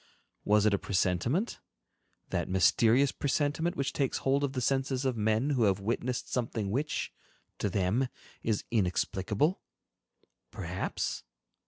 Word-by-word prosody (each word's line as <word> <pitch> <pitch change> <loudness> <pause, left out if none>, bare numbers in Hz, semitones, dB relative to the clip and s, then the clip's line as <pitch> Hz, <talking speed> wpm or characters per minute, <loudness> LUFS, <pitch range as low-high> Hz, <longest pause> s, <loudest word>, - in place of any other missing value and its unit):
Was 105 0 +4
it 105 - +4
a 100 - +2
presentiment—that 95 - -2
mysterious 115 +8 +4
presentiment 145 +5 0
which 140 -5 -1
takes 135 -3 0
hold 140 +1 +1
of 140 -1 -1
the 130 - -1
senses 135 +1 0
of 130 -2 +1
men 110 +5 +1
who 125 -5 +3
have 100 -1 +2
witnessed 120 +4 -2
something 115 -5 -1
which, 145 +7 -2 0.5
to 105 - 0
them, 100 +8 +1 0.3
is 110 -3 0
inexplicable? 105 - +1 0.9
Perhaps? - - -3
120 Hz, 125 wpm, -30 LUFS, 100-135 Hz, 0.9 s, Was